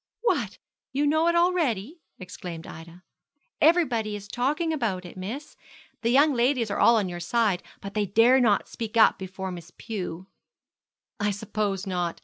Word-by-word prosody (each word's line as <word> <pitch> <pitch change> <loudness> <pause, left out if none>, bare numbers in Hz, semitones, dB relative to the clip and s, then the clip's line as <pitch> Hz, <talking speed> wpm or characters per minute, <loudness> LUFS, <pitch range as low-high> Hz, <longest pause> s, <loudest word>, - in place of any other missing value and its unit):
'What! 475 - 0 0.3
you 275 +3 0
all 290 - +3
know 315 +2 +2
it 340 - +2
already?' 330 - +1 0.2
exclaimed 180 -3 -8
Ida. 165 +2 -11 0.6
'Everybody 250 -11 +3
is 205 -1 -8
talking 295 +9 -1
about 210 -11 -2
it, 175 - -10
miss. 230 +11 -7 0.5
The 230 - 0
young 285 +4 +5
ladies 240 -3 +1
are - - -2
all 235 - +6
on 210 -4 +1
your 175 -1 -6
side; 200 0 +1 0.2
but 200 0 -7
they 210 -1 0
dare 230 +7 +5
not 220 -5 +2
speak 230 0 -5
up 220 - +5
before 190 0 -6
Miss 175 -1 -9
Pew.' 185 -5 -5 0.9
'I 205 0 +1
suppose 205 -1 -2
not. 175 -3 -2
215 Hz, 165 wpm, -26 LUFS, 190-265 Hz, 0.9 s, all